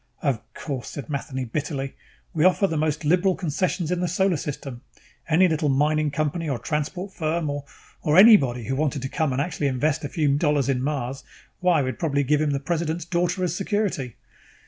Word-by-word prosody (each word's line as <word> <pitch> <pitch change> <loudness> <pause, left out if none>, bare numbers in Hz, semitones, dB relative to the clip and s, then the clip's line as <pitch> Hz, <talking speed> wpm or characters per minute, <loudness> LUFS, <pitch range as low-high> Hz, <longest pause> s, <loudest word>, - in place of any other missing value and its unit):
"Of 135 -6 +1 0.2
course," 135 -5 -5
said 140 -2 -7
Matheny 140 -2 -3
bitterly. 140 +2 -3 0.4
"We 155 - +1
offer 185 +2 +4
the 165 - -1
most 155 0 -1
liberal 180 +4 +3
concessions 175 0 -1
in 180 - 0
the 180 - 0
Solar 185 +2 +2
System. 135 -4 -5 0.5
Any 175 +4 +5
little 160 -3 0
mining 150 +2 +2
company 155 +2 -2
or 135 - -1
transport 160 - -3
firm 160 -2 -1
or 145 0 -5 0.4
or 150 +2 +2
anybody 145 - +7
who 130 +5 -2
wanted 145 -2 -1
to 135 - -3
come 155 0 0
and 130 - -1
actually 145 -1 -1
invest 145 +4 0
a 145 - -3
few 145 -3 +1
dollars 150 -3 +2
in 130 -2 +1
Mars 135 -2 -3 0.4
why, 175 -5 +3
we'd 130 0 -4
probably 145 -5 +1
give 150 +2 +2
him 155 - +1
the 140 -1 0
President's 165 +2 -2
daughter 180 +1 0
as 180 -1 0
security. 195 - -2
150 Hz, 190 wpm, -24 LUFS, 140-175 Hz, 0.5 s, anybody